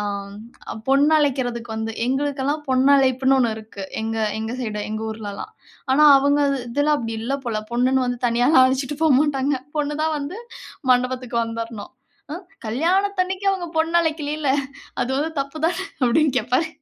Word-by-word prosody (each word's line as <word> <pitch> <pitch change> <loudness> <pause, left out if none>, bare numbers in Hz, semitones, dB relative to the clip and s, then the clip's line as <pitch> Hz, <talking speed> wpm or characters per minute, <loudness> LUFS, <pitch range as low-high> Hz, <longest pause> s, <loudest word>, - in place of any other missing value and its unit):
அ - - -2 0.9
பொண்ணை 285 +3 +4
அழைக்குறதுக்கு 245 -5 -1
வந்து 220 0 -3
எங்களுக்கெல்லாம் 285 +2 -1
பொண்ணு 260 +2 +3
அழைப்புன்னு 265 0 +3
ஒண்ணு 235 -3 +2
இருக்கு. 215 -2 -9 0.2
எங்க 225 0 -3 0.2
எங்க 220 +2 -4
சைடு, 215 -3 -3
எங்க 215 - -3
ஊர்லலாம். 210 -2 -7 0.4
ஆனா 300 +3 +4 0.2
அவங்க 285 +1 +2 0.3
இதுல 290 +5 +1
அப்படி 225 -3 -4
இல்ல 270 +5 -1
போல. 220 -3 -2
பொண்ணுன்னு 255 +2 +2
வந்து 245 -1 -2
தனியாலாம் 245 +4 +4
அழைச்சிட்டு 265 +2 0
போமாட்டாங்க. 280 -2 +3 0.2
பொண்ணு 295 0 -1
தான் 315 0 0
வந்து 290 +9 -6 0.5
மண்டபத்துக்கு 250 -1 +1
வந்திரணும். 230 -1 -6 0.4
அ - - -3 0.3
கல்யாணம் 370 - +1
அன்னைக்கு 380 +1 -5
அவங்க 355 -3 -4
பொண்ணு 330 +2 +3
அழைக்கிலல. 300 -3 -1 0.5
அது 255 - -3
வந்து 320 +2 -2
தப்புதானே? 320 +7 -2 0.2
அப்படின்னு 275 +4 +3
கேப்பார். 320 +8 0
265 Hz, 145 wpm, -22 LUFS, 235-300 Hz, 0.9 s, பொண்ணை